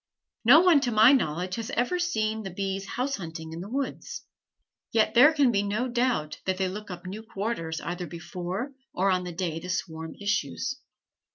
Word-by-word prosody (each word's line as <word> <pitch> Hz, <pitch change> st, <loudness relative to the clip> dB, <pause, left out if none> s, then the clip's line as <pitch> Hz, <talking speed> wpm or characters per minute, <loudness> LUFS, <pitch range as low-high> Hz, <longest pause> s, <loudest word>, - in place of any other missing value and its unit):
No 265 Hz, +8 st, +8 dB
one, 355 Hz, -5 st, +6 dB
to 250 Hz, -, 0 dB
my 220 Hz, +3 st, +7 dB
knowledge, 180 Hz, -, 0 dB
has 225 Hz, -1 st, -4 dB
ever 250 Hz, +10 st, +1 dB
seen 220 Hz, -11 st, 0 dB
the 195 Hz, -, -5 dB
bees 195 Hz, +1 st, -3 dB
house 265 Hz, +4 st, -2 dB
hunting 160 Hz, -3 st, -7 dB
in 165 Hz, -, -6 dB
the 195 Hz, -, -7 dB
woods. 275 Hz, +3 st, -4 dB, 0.7 s
Yet 220 Hz, -1 st, +3 dB
there 270 Hz, +6 st, +8 dB
can 285 Hz, -5 st, +3 dB
be 200 Hz, -3 st, +2 dB
no 210 Hz, +5 st, -1 dB
doubt 240 Hz, -11 st, 0 dB
that 190 Hz, -1 st, 0 dB
they 190 Hz, 0 st, +1 dB
look 210 Hz, +3 st, -6 dB
up 180 Hz, 0 st, -8 dB
new 195 Hz, +4 st, -6 dB
quarters 200 Hz, -7 st, -3 dB
either 175 Hz, +1 st, -4 dB
before 180 Hz, -, -5 dB, 0.2 s
or 190 Hz, +2 st, +2 dB
on 180 Hz, -1 st, 0 dB
the 180 Hz, -, -4 dB
day 165 Hz, -2 st, -3 dB
the 180 Hz, -, -8 dB
swarm 160 Hz, -3 st, -4 dB
issues. 205 Hz, -, -2 dB
200 Hz, 190 wpm, -27 LUFS, 180-245 Hz, 0.7 s, No